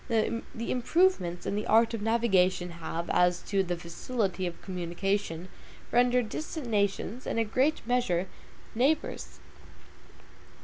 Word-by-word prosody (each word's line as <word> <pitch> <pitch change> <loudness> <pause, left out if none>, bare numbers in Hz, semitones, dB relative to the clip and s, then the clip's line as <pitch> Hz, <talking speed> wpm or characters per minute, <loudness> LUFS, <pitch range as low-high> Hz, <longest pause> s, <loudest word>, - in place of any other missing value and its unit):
The 230 0 +1 0.2
improvements 240 - +1
in - - -1
the 210 - -2
art 225 +1 +4
of 225 - -3
navigation 190 -6 +2
have, 170 0 -5
as 180 0 +3
to 195 -1 +1
the 175 -2 -2
facility 185 +2 -2
of 170 - -7
communication, 180 -1 -2 0.4
rendered 245 0 +3
distant 310 +4 -5
nations, 210 +2 -1
in - - -2
a 230 - +3
great 260 +8 +1
measure, 230 -8 +1 0.5
neighbors. 280 +7 0
210 Hz, 125 wpm, -29 LUFS, 180-240 Hz, 0.5 s, art